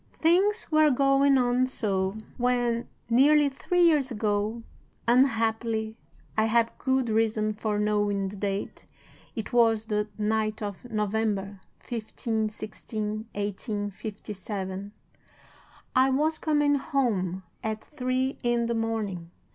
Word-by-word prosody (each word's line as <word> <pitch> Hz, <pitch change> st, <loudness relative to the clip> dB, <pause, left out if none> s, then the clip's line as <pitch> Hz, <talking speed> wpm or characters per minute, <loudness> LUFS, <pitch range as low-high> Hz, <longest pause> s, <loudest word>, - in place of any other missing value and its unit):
"'Things 380 Hz, +7 st, +3 dB
were 310 Hz, -1 st, +5 dB
going 275 Hz, +1 st, +4 dB
on 250 Hz, 0 st, +2 dB
so, 195 Hz, -5 st, -1 dB, 0.2 s
when, 245 Hz, -1 st, +1 dB, 0.2 s
nearly 285 Hz, +5 st, +5 dB
three 355 Hz, +6 st, +1 dB
years 300 Hz, -6 st, +4 dB
ago 215 Hz, 0 st, -1 dB, 0.4 s
(unhappily, 225 Hz, -3 st, +2 dB, 0.4 s
I 220 Hz, -, +3 dB
have 230 Hz, +1 st, +2 dB
good 260 Hz, -2 st, +1 dB
reason 215 Hz, -1 st, +1 dB
for 210 Hz, 0 st, -2 dB
knowing 205 Hz, -1 st, +1 dB
the 200 Hz, -, -9 dB
date, 200 Hz, 0 st, -4 dB, 0.5 s
it 220 Hz, -1 st, -5 dB
was 225 Hz, -2 st, +4 dB
the 210 Hz, -1 st, -1 dB
night 215 Hz, 0 st, 0 dB
of 200 Hz, -3 st, -5 dB
November 210 Hz, -2 st, -1 dB, 0.2 s
15 220 Hz, -1 st, -2 dB
16, 215 Hz, 0 st, -5 dB, 0.3 s
1857), 205 Hz, -1 st, -4 dB, 1.0 s
I 260 Hz, +1 st, +5 dB
was 305 Hz, +4 st, +1 dB
coming 295 Hz, -2 st, +2 dB
home 210 Hz, -, -1 dB, 0.2 s
at 220 Hz, 0 st, -3 dB
three 260 Hz, -2 st, -2 dB
in 240 Hz, -1 st, +1 dB
the 235 Hz, -, -1 dB
morning. 220 Hz, -7 st, -2 dB
225 Hz, 115 wpm, -27 LUFS, 210-255 Hz, 1.0 s, were